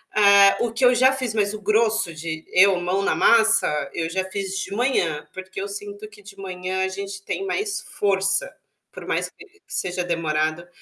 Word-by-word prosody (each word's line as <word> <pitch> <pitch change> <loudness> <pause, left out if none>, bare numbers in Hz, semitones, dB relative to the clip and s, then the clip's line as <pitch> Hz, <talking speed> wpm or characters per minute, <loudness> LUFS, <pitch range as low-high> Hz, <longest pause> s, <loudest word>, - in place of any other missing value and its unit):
hã, 200 -1 +6
o 225 - -3
que 245 - -3
eu 250 0 +5
já 260 +2 +5
fiz, 255 -4 -3
mas 205 -1 +1
o 215 - -7
grosso 215 -2 +1
de 160 0 -6
eu 190 +1 +5
mão 185 +3 0
na - - +1
massa 225 -9 +3
eu 165 -1 -2
já 190 +2 -1
fiz 195 -1 -4
de - - -5
manhã, 175 - 0
porque 185 0 -7
eu 200 - -4
sinto 205 +1 -8
que 210 -1 -17
de 200 0 -13
manhã 185 0 -4
a - - -1
gente 195 +1 -7
tem 390 - -4
mais 405 +2 -2
força, 200 - 0 0.4
por - - -10
mais - - -1
que 425 - -16 0.2
seja 180 -1 -3
demorado, 160 0 -1
195 Hz, 195 wpm, -22 LUFS, 180-215 Hz, 0.4 s, hã